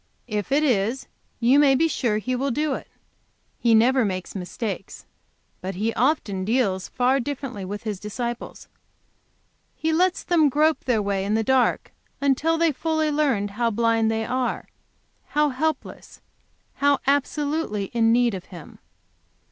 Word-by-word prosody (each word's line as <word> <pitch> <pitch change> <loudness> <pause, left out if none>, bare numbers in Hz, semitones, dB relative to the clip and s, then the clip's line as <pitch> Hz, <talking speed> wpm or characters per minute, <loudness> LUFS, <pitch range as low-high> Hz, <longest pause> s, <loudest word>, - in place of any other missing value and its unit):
If 210 +1 -3
it 290 +2 +3
is, 235 -1 +1 0.3
you 250 +4 +4
may 280 -2 +5
be 325 +5 +3
sure 235 -8 0
He 250 +4 -2
will 270 +3 -1
do 295 +3 0
it. - - -6 0.7
He 230 -2 +4
never 250 +3 +4
makes 185 -3 -3
mistakes. 195 +1 -5 0.6
But 190 +1 -5
He 220 +4 -1
often 225 -8 0
deals 200 -4 0
far 255 +2 +1
differently 270 -6 -5
with 205 +2 -6
His 210 -4 -4
disciples. 235 +3 -5 1.1
He 320 0 -1
lets 365 +2 +2
them 320 -4 +3
grope 305 +3 +2
their 230 -5 +1
way 200 -1 -1
in 205 +2 0
the 225 - +1
dark 260 +1 +1 0.3
until 285 +4 +2
they 330 -1 +3
fully 315 +1 -1
learn 270 -9 +1
how 230 +4 0
blind 225 0 +2
they 225 0 -1
are, 255 -1 -2 0.6
how 300 0 +2
helpless, 295 +2 -4 0.6
how 285 0 +3
absolutely 285 -6 -1
in 225 -1 +3
need 240 -1 +3
of 185 -2 -6
Him. 170 -5 -12
245 Hz, 150 wpm, -24 LUFS, 210-285 Hz, 1.1 s, may